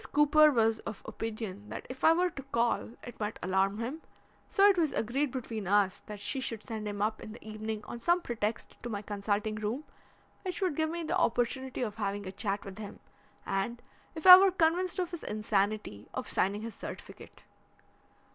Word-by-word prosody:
Cooper 295 +1 +6
was 225 -4 +2
of 215 - -7
opinion 215 -2 -5
that - - -6
if 255 +1 -9
I 320 - +8
were 355 +2 +2
to 275 - -7
call 235 -4 0
it 245 - -10
might 210 0 -3
alarm 190 +2 +1
him, 250 +8 -4 0.5
so 395 0 +5
it 405 - +5
was 325 -5 +1
agreed 265 +6 0
between 230 -6 -5
us 200 -1 +3
that 210 -1 -7
she 265 +7 -2
should 230 -4 -4
send 215 -2 -5
him 205 0 -2
up 215 +1 -1
in 215 - -8
the 225 - -13
evening 215 0 -4
on 235 - -7
some 345 +9 +3
pretext 230 -7 -3
to 240 - -5
my 205 -2 -4
consulting 205 +1 -1
room, 215 +6 -3 0.6
which 370 -3 -4
would 370 -7 0
give 315 +1 +1
me 340 +1 -3
the 330 +3 -1
opportunity 255 -2 0
of 215 -2 -4
having 200 -1 -2
a 185 - -5
chat 200 0 -2
with 195 +1 -8
him 205 -2 -8 0.5
and, 200 +5 -1 0.4
if 320 - -7
I 365 0 +14
were 390 0 +6
convinced 355 0 +1
of 360 -2 -1
his 345 - -6
insanity, 210 - -1
of - - -3
signing 200 +3 0
his 230 -1 -5
certificate. - - -10
225 Hz, 195 wpm, -31 LUFS, 210-295 Hz, 0.6 s, I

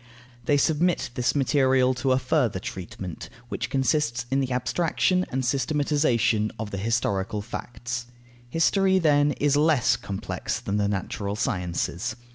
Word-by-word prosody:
They 145 - +3
submit 160 +1 +1
this 125 +3 0
material 130 -2 +3
to 130 +1 -1
a 130 - +4
further 130 -5 +1
treatment, 90 -1 -7 0.2
which - - -3
consists 130 -3 0
in 135 - +2
the 130 -1 -1
abstraction 175 +8 +1
and 130 0 -2
systematization 130 -6 +1
of 110 -1 -5
the 100 - -4
historical 105 -2 -1
facts. 120 +1 -5 0.4
History, 190 +6 +3
then, 145 -4 +3
is 145 0 +1
less 150 -3 +3
complex 100 -1 -4
than 100 - -2
the 100 -1 +1
natural 100 0 -3
sciences. 90 0 -2
125 Hz, 135 wpm, -25 LUFS, 105-145 Hz, 0.4 s, a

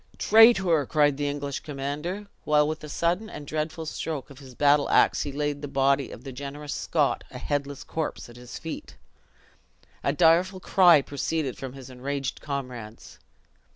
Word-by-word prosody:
"Traitor!" 195 -8 +6
cried 145 -3 +3
the 145 0 -1
English 145 -1 -3
commander, 150 +8 -4 0.2
while 150 -1 +3
with 155 0 -4
a 150 - -7
sudden 175 +8 0
and 150 - -8
dreadful 155 +2 -3
stroke 155 -3 -5
of 135 - -13
his 130 -3 -13
battle 145 +1 +3
ax - - +4
he 145 - -3
laid 145 0 -2
the 145 - -4
body 135 0 +2
of 115 - -10
the 135 - -7
generous 140 +3 -6
Scot - - 0
a - - -9
headless 145 -1 -3
corpse 160 -2 -4
at 120 - -14
his 125 0 -9
feet. 160 -1 -7 1.1
A - - +2
direful 175 +5 +3
cry 175 -6 +5
proceeded 140 0 -2
from 130 -2 -7
his 135 -1 -11
enraged 135 +1 -4
comrades. 125 -6 -7
145 Hz, 165 wpm, -26 LUFS, 135-160 Hz, 1.1 s, Traitor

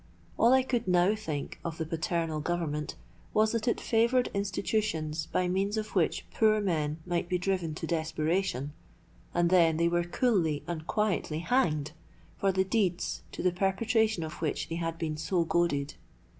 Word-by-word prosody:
All 235 - +4
I 260 0 +5
could 245 -5 -1
now 180 +2 +4
think 160 -10 -5
of 165 -1 -4
the 160 - -2
paternal 165 0 -1
Government 150 -2 -2 0.4
was, 215 0 +4
that 230 0 -2
it 235 - +2
favoured 235 +2 +2
institutions 195 -6 -1
by 180 - 0
means 195 +4 0
of 215 0 -4
which 175 -4 +1
poor 215 -1 +4
men 155 -7 0
might 175 -1 -1
be 180 - +1
driven 180 -4 -1
to - - -4
desperation, 160 -2 -1 0.6
and 175 0 +2
then 165 -3 +5
they 170 +1 +3
were 175 0 +1
coolly 175 - +1
and 160 -2 -5
quietly 210 -7 0
hanged 160 - +1 0.4
for 195 - +1
the 190 0 +1
deeds 190 -3 0
to - - -5
the 180 - +3
perpetration 210 +2 +1
of 160 0 -7
which 155 -3 -2
they 165 - -3
had 165 -1 -3
been 155 -2 -3
so 170 +2 0
goaded. 160 -5 0
175 Hz, 170 wpm, -29 LUFS, 160-205 Hz, 0.6 s, I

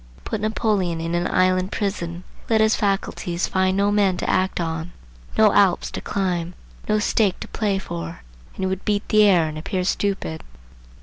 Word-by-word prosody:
Put 215 - -3
Napoleon 210 -5 0
in 165 +1 -3
an 175 +1 +1
island 185 0 +2
prison, 180 -4 -3 0.3
let 225 -1 +3
his 220 +1 +4
faculties 195 -3 -1
find 190 0 +1
no 200 +1 +2
men 200 -3 +2
to - - -3
act 185 0 +1
on, 165 0 -3 0.4
no 215 -2 +5
Alps 195 -3 +3
to - - -5
climb, 180 -3 -2 0.3
no 215 - +3
stake 210 -2 +1
to - - -5
play 205 -3 -1
for, 85 - -6 0.3
and - - -5
he - - +2
would 190 0 -2
beat 205 0 -1
the 215 - +5
air, 175 -5 +4
and 155 0 -5
appear 185 +3 -2
stupid. 190 -4 -1
190 Hz, 180 wpm, -22 LUFS, 175-205 Hz, 0.4 s, no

